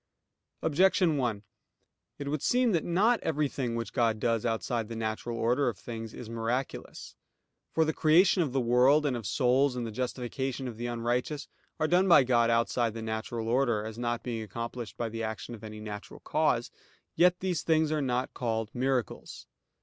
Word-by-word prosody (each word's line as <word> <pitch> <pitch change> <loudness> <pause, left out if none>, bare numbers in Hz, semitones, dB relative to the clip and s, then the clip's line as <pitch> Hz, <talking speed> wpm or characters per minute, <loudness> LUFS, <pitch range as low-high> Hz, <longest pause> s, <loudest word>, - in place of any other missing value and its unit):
Objection 175 +1 +3
1: 115 -6 -1 0.7
It 140 - -6
would 145 0 -2
seem 245 -1 +3
that 170 -5 +1
not 210 +8 +3
everything 140 -6 -1
which 115 0 -4
God 115 -4 +1
does 115 0 +1
outside 115 0 -1
the 115 - -5
natural 115 +1 -3
order 125 +5 +2
of 110 - -6
things, 115 -2 -7
is 120 - -9
miraculous. 115 +3 -4 0.6
For 160 - +2
the 160 - 0
creation 175 +4 +4
of 150 -6 0
the 135 - +1
world, 130 +5 +4
and 135 -3 +1
of 115 -5 -4
souls, 130 +3 +2
and 120 -1 -3
the 115 - -5
justification 130 +2 -3
of 115 -3 -7
the 120 +1 -3
unrighteous, 120 +5 -2 0.3
are 155 - +2
done 180 +3 +3
by 170 -6 +7
God 120 -2 +3
outside 115 0 +1
the 115 - -5
natural 110 +1 -3
order; 120 -3 +1
as 110 +1 -7
not 120 -1 -2
being 120 -2 -3
accomplished 115 +2 -6
by 120 - -1
the 115 0 -5
action 110 +2 -4
of 110 - -10
any 110 0 -8
natural 105 -1 -8
cause. - - +1 0.4
Yet 180 0 +4
these 180 -4 -1
things 160 -1 +2
are 155 -1 +1
not 125 -1 -1
called 115 -3 -2
miracles. 130 -1 -2
120 Hz, 180 wpm, -29 LUFS, 115-145 Hz, 0.7 s, by